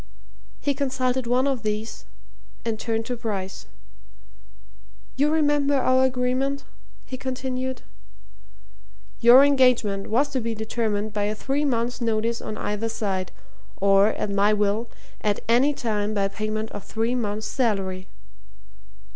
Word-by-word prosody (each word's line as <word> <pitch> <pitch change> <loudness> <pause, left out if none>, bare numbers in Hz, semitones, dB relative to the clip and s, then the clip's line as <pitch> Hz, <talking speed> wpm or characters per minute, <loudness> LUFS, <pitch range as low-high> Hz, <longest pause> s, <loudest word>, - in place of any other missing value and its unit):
He 285 - 0
consulted 260 -2 -1
one 250 +2 +2
of 265 -4 0
these 210 - -4 0.6
and 225 -2 -2
turned 225 -1 -2
to 250 - -3
Bryce. 200 - -5 1.5
"You 285 +3 +3
remember 290 -2 +2
our 260 -1 +3
agreement?" 260 +2 0 0.4
he 260 - -6
continued. 260 0 -4 1.4
"Your 245 +3 +8
engagement 250 -8 +3
was 275 +6 +2
to 265 -3 -2
be 230 0 -3
determined 220 -1 -2
by 205 -1 0
a 210 +1 -1
three 275 +6 -1
months' 240 -2 -1
notice 230 0 0
on 215 - -5
either 210 +2 -2
side, 195 -4 -2 0.5
or, 195 +1 +5
at 205 - -3
my 200 +1 +3
will, 210 +2 0 0.3
at 205 -1 0
any 245 +5 +4
time 215 -6 -2
by 200 -1 +2
payment 215 +1 -3
of 205 - -7
three 225 +2 -1
months' 215 -3 -2
salary?" 195 -7 -1
230 Hz, 130 wpm, -24 LUFS, 210-260 Hz, 1.5 s, Your